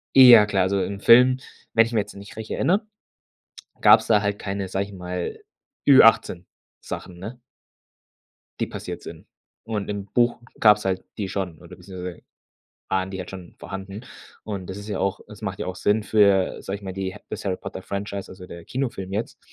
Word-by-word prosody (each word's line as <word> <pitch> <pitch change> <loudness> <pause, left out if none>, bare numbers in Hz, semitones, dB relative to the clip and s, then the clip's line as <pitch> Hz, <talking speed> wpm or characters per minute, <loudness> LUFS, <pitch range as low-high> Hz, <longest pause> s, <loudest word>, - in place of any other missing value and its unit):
Eh, 130 -2 +10
ja 110 -3 +10
klar. 95 -2 +1
Also 95 +1 +1
im 100 +2 -3
Film, 125 +3 +6 0.4
wenn 115 0 +6
ich 115 - -7
mich 110 - +3
jetzt 100 - -10
nicht 100 +1 -11
recht 110 0 -7
erinnere, 200 +5 +1 1.0
gab's - - +7
da 105 -2 +5
halt 100 0 -1
keine, 100 -1 -4
sage 95 +1 -2
ich 100 - -13
mal, 90 -1 -5 0.5
Ü 135 -2 +9
18- 95 -5 +4 0.4
Sachen, 90 -1 -7
ne 110 +7 -8 1.2
die - - 0
passiert - - -7
sind. - - -10 0.4
Und 105 -3 -4
im 100 -1 -4
Buch 120 +4 +1 0.2
gab's 105 -2 +5
halt 95 -1 -1
die 100 -3 -3
schon 95 -4 -4
oder - - -12
beziehungsweise 90 -2 -8 0.7
waren 95 0 -1
die 95 - -6
halt 90 - -6
schon 95 -2 -10
vorhanden. 95 +2 -7 0.4
Und 100 -4 -5
das 95 - -6
ist 105 +1 -9
ja 105 - -3
auch 95 0 -1
es - - -13
macht - - -4
ja - - -4
auch 95 - -5
Sinn 105 +3 +1
für, 100 -3 +3
sage 100 - -4
ich - - -21
mal, 95 -1 -5
die 95 0 -4
das - - -6
Harry-Potter-Franchise, 100 +1 -5
also 95 -1 -11
der 85 -1 -10
Kinofilm 115 -7 -4
jetzt, 110 +3 -3
100 Hz, 190 wpm, -24 LUFS, 95-105 Hz, 1.2 s, Eh